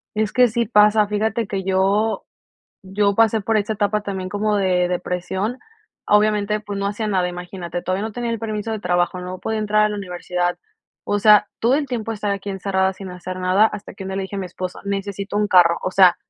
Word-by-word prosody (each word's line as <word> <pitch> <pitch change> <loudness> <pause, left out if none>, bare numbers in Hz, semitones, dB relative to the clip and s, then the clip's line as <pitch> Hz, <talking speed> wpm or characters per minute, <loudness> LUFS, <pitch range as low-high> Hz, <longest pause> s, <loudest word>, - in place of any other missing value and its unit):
Es 215 -1 0
que 250 -1 +5
sí 235 +1 -1
pasa, 210 +1 +5
fíjate 220 +2 -1
que 195 -1 -3
yo, 195 +4 +1 0.6
yo 200 +1 +1
pasé 225 0 +3
por 220 +2 +1
esta 210 +1 0
etapa 210 0 0
también 190 -2 -4
como 210 +2 0
de 185 -3 +2
depresión. 180 +5 -2 0.5
Obviamente, 210 0 +2
pues, 205 -1 -6
no 200 - -2
hacía 210 +2 -2
nada, 185 -3 +1
imagínate, 175 -1 -6
todavía 185 +3 -2
no 220 - -4
tenía 240 +1 -3
el 230 - -1
permiso 215 0 -3
de 220 - -3
trabajo, 180 -1 0
no 180 0 -6
podía 220 0 -2
entrar 215 0 +2
a - - +1
la 210 - -3
universidad, 180 -2 -2 0.5
o 205 - 0
sea, 210 0 +6
todo 235 +3 +3
el 285 -1 -1
tiempo 230 -3 -3
estar 210 -1 -3
aquí 200 0 -3
encerrada 190 0 0
sin 190 0 -9
hacer 180 +1 -7
nada, 185 +3 +4
hasta 210 -3 -5
que 195 - -8
un 190 - -6
día 190 - -4
le - - -1
dije 190 - -7
a - - -2
mi 190 - -3
esposo, 185 0 -6
necesito 200 0 -3
un 210 - +1
carro, 175 -3 +5
o - - 0
sea, 185 -2 +6
200 Hz, 220 wpm, -21 LUFS, 185-215 Hz, 0.6 s, sea